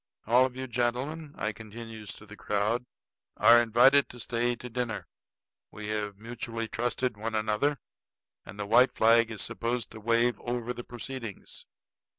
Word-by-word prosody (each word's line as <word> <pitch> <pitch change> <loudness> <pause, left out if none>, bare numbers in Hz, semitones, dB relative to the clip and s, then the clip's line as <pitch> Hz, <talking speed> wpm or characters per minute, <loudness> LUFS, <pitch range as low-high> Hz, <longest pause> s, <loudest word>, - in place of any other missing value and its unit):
All 125 +4 +5
of 125 - -13
you 130 0 -4
gentlemen," 130 +6 -2
I 105 - -1
continues 110 0 -8
to 105 - -13
the 105 0 -11
crowd, 105 +5 -1 0.5
"are 120 0 +7
invited 125 +5 +5
to 120 - -11
stay 120 +1 0
to 125 - -9
dinner. 120 -2 -3 0.6
We 105 0 -7
have 105 -2 -2
mutually 115 +1 -5
trusted 120 +1 -1
one 110 +1 -3
another, 110 +7 +1 0.7
and 100 - -11
the 105 - -3
white 120 +5 +5
flag 115 +1 +5
is 110 -3 -2
supposed 120 0 -2
to 110 - -9
wave 115 +2 +2
over 120 0 -3
the 120 - -7
proceedings." 120 -3 -7
115 Hz, 160 wpm, -29 LUFS, 110-125 Hz, 0.7 s, are